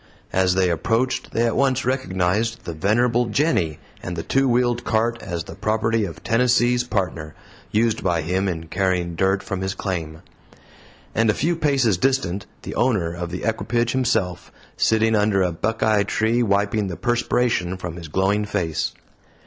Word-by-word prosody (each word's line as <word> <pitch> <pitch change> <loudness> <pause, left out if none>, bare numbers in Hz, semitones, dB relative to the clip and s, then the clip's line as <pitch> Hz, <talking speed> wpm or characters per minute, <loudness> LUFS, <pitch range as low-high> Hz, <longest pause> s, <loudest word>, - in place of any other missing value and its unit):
As 95 -1 +3
they 95 -2 +3
approached, 115 +10 0
they 115 - +1
at 115 - 0
once 130 -1 +1
recognized 115 -2 0
the 85 - -4
venerable 120 +7 +2
"Jenny" 110 - +1 0.2
and 90 - -5
the 80 - -4
two 135 0 +2
wheeled 120 0 +1
cart 115 +1 0
as 85 -4 -4
the - - -10
property 110 0 0
of 85 - -9
Tennessee's 120 +1 +3
Partner 85 -9 -3 0.3
used 115 0 +1
by 85 -3 +1
him 95 +4 0
in 80 -3 -3
carrying 90 -1 0
dirt 95 +3 +1
from 95 -1 -4
his 95 +1 -2
claim; 80 -5 -4 0.9
and 115 0 +2
a 105 - +3
few 170 +3 +1
paces 135 - +2
distant 100 -8 0 0.2
the - - -6
owner 105 -10 +1
of 85 0 -5
the 90 +1 -5
equipage 120 +1 0
himself, 110 -9 -1 0.2
sitting 110 0 +2
under 105 -2 +2
a 90 - 0
buckeye 110 +4 +1
tree, 110 +4 +1
wiping 100 -1 +1
the 90 - -5
perspiration 120 -6 0
from 90 -2 -6
his 85 -2 -8
glowing 95 +6 +1
face. 90 -7 -2
105 Hz, 165 wpm, -22 LUFS, 90-120 Hz, 0.9 s, As